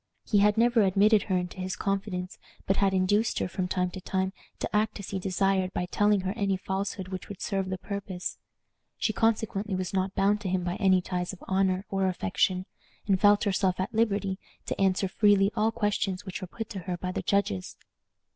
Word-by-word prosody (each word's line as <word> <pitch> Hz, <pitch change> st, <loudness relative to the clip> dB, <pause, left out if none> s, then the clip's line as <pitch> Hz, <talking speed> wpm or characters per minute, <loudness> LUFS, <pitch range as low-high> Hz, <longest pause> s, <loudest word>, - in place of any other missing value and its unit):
He 205 Hz, -, +3 dB
had 210 Hz, +1 st, +4 dB
never 235 Hz, 0 st, +4 dB
admitted 205 Hz, +2 st, +4 dB
her 185 Hz, -, +3 dB
into 180 Hz, +1 st, -4 dB
his 185 Hz, +2 st, -3 dB
confidence, 195 Hz, -3 st, -3 dB, 0.3 s
but 195 Hz, -, +1 dB
had 195 Hz, -1 st, +3 dB
induced 205 Hz, +4 st, +2 dB
her, -, -, 0 dB
from 185 Hz, 0 st, -2 dB
time 180 Hz, 0 st, 0 dB
to 185 Hz, -, -7 dB
time, 190 Hz, 0 st, -1 dB, 0.2 s
to -, -, -3 dB
act 215 Hz, 0 st, +1 dB
as 200 Hz, -, -7 dB
he 195 Hz, -, -2 dB
desired 190 Hz, 0 st, +1 dB
by 180 Hz, -, -1 dB
telling 205 Hz, +2 st, +2 dB
her 190 Hz, 0 st, -2 dB
any 200 Hz, -4 st, 0 dB
falsehood 190 Hz, 0 st, -3 dB
which 185 Hz, -1 st, -6 dB
would 205 Hz, -, -8 dB
serve 195 Hz, -3 st, -2 dB
the 185 Hz, -, -2 dB
purpose. 195 Hz, -2 st, -5 dB, 0.6 s
She 215 Hz, -, 0 dB
consequently 215 Hz, -3 st, 0 dB
was 185 Hz, 0 st, -3 dB
not 190 Hz, 0 st, 0 dB
bound 205 Hz, +2 st, +2 dB
to 195 Hz, -, -3 dB
him 185 Hz, -1 st, 0 dB
by 175 Hz, +2 st, -2 dB
any 190 Hz, -3 st, +4 dB
ties 180 Hz, 0 st, -3 dB
of 190 Hz, -, -12 dB
honor 190 Hz, 0 st, +1 dB
or 195 Hz, -1 st, +1 dB
affection, 185 Hz, 0 st, 0 dB, 0.4 s
and 195 Hz, -2 st, +2 dB
felt 205 Hz, -1 st, +5 dB
herself 190 Hz, -3 st, +1 dB
at 190 Hz, +6 st, -2 dB
liberty 200 Hz, -4 st, +1 dB, 0.3 s
to -, -, -3 dB
answer 190 Hz, 0 st, +2 dB
freely 200 Hz, 0 st, +4 dB
all 220 Hz, +1 st, +2 dB
questions 205 Hz, -3 st, -1 dB
which 180 Hz, -4 st, -5 dB
were 185 Hz, -, -5 dB
put 225 Hz, +4 st, -6 dB
to 200 Hz, -, -4 dB
her 180 Hz, 0 st, -4 dB
by 180 Hz, +1 st, -3 dB
the -, -, -3 dB
judges. 200 Hz, -, -1 dB
195 Hz, 205 wpm, -28 LUFS, 185-205 Hz, 0.6 s, felt